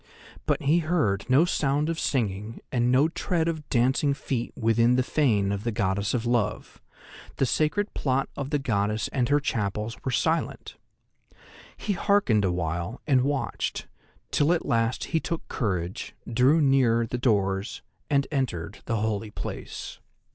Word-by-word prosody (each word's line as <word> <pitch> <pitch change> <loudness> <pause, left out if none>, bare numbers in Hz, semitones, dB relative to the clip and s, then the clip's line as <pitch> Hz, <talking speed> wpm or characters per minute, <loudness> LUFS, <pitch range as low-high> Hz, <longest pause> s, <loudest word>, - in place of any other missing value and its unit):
But - - +1
he 155 +5 +4
heard 140 - 0
no 135 +6 +5
sound 145 -3 +1
of 165 -1 -2
singing 110 -3 -1
and 120 0 +2
no 135 +4 +5
tread 165 0 -1
of 160 -3 -3
dancing 130 +3 +2
feet 130 -4 -3
within 115 +1 +3
the 130 - +2
fane 110 -9 +2
of 100 0 -3
the 115 - -1
Goddess 100 +1 0
of 120 -1 -1
Love; 120 -3 -1 0.5
the 135 - +1
sacred 155 - 0
plot 135 0 0
of 140 -1 -4
the 150 - +1
goddess 105 -5 -1
and 125 -2 0
her 145 0 +4
chapels 110 -4 -2
were - - -1
silent. 160 +6 -1 1.0
He 205 - -2
hearkened 195 - +2
awhile, 85 +3 -2
and 135 -4 +4
watched, 140 +1 -2 0.5
till 145 +3 +3
at 175 - -1
last 115 +1 +1
he 165 - +4
took 165 0 -4
courage, 95 -4 -3
drew 130 +7 +4
near 130 -5 +3
the 125 +2 -4
doors, 100 -4 0 0.3
and 140 -2 +2
entered 120 - -2
the 115 - -1
holy 110 0 -1
place. - - -7
125 Hz, 155 wpm, -26 LUFS, 105-145 Hz, 1.0 s, no